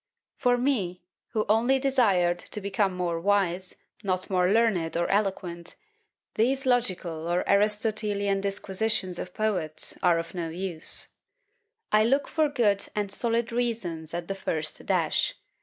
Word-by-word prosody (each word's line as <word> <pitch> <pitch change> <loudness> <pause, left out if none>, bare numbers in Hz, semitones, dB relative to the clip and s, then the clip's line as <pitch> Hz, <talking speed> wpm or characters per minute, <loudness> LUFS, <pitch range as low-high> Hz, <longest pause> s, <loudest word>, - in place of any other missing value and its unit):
For 245 -3 +2
me, 210 -10 -1 0.2
who 215 -2 -1
only 235 +5 +3
desired 205 -11 +3
to - - -5
become 200 -1 0
more 175 -2 -1
wise, 190 -2 +1 0.3
not 185 -1 -2
more 180 -1 +3
learned 200 -7 +2
or 170 - +1
eloquent, 190 -4 -2 0.6
these 265 +5 +1
logical 185 -10 0
or 175 +1 +1
Aristotelian 205 -1 +1
disquisitions 195 -1 -1
of 180 - -7
poets 185 -8 -1
are 175 -2 +4
of 165 0 -4
no 170 -3 -3
use. 175 -1 -1 0.8
I 215 0 +5
look 270 +5 +2
for 310 -2 +1
good 210 -7 +1
and 205 -2 -1
solid 230 +2 0
reasons 190 -10 -2
at 170 0 -4
the 195 - -2
first 155 -5 -4
dash. - - +1
200 Hz, 140 wpm, -27 LUFS, 175-225 Hz, 0.8 s, I